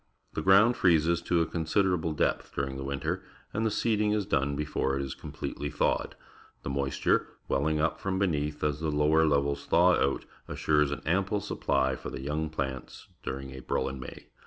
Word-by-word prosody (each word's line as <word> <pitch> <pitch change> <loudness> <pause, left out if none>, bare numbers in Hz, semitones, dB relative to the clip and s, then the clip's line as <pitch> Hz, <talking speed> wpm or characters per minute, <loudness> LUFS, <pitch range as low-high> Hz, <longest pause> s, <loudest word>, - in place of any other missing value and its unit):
The - - -2
ground 105 +5 +5
freezes 85 -1 +3
to 85 -1 +1
a - - +2
considerable 85 0 0
depth - - -1
during 70 -1 -2
the 65 - -5
winter, 70 0 -2 0.3
and 110 - -1
the 110 - +2
seeding 105 -1 +1
is 105 -2 0
done 70 -2 0
before 70 -2 -1
it 70 - -1
is 65 - -4
completely 75 - -5
thawed. - - 0 0.5
The - - -3
moisture, 70 0 +1 0.2
welling 75 +3 +1
up 85 +2 0
from 95 -1 -2
beneath 75 -6 -1
as 75 -1 0
the 80 0 -1
lower 75 +2 +3
levels 70 -1 0
thaw - - +5
out, 70 - +1 0.2
assures 75 -2 +2
an 70 - -5
ample 95 +5 +1
supply 65 -7 0
for - - -7
the 65 - -6
young 75 +3 -2
plants 65 -4 -5
during 65 0 -5
April 65 0 -2
and 65 -1 -5
May. 65 - -9
75 Hz, 185 wpm, -29 LUFS, 70-85 Hz, 0.5 s, ground